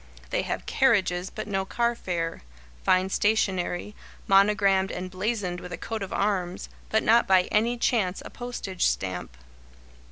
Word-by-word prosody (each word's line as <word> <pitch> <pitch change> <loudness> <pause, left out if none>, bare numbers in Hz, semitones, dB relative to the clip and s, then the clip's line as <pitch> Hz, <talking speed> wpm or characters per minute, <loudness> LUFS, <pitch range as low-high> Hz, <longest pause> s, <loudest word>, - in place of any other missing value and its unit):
They - - +1
have - - -4
carriages 190 -8 +2
but - - -6
no 195 -2 -1
car 235 +4 0
fare; 170 -7 -3 0.4
fine 185 +1 +3
stationery, 195 -2 0 0.3
monogrammed 195 -1 +4
and 185 0 -5
blazoned 185 -2 -2
with 180 - -9
a - - -4
coat 225 -1 -5
of 195 - -5
arms, 185 -3 -1 0.2
but 220 - +2
not 230 +2 +4
by 185 -1 +5
any 230 +3 +2
chance 210 -6 +1
a - - -8
postage 240 -7 -2
stamp. 90 -9 -3
195 Hz, 150 wpm, -26 LUFS, 180-220 Hz, 0.4 s, by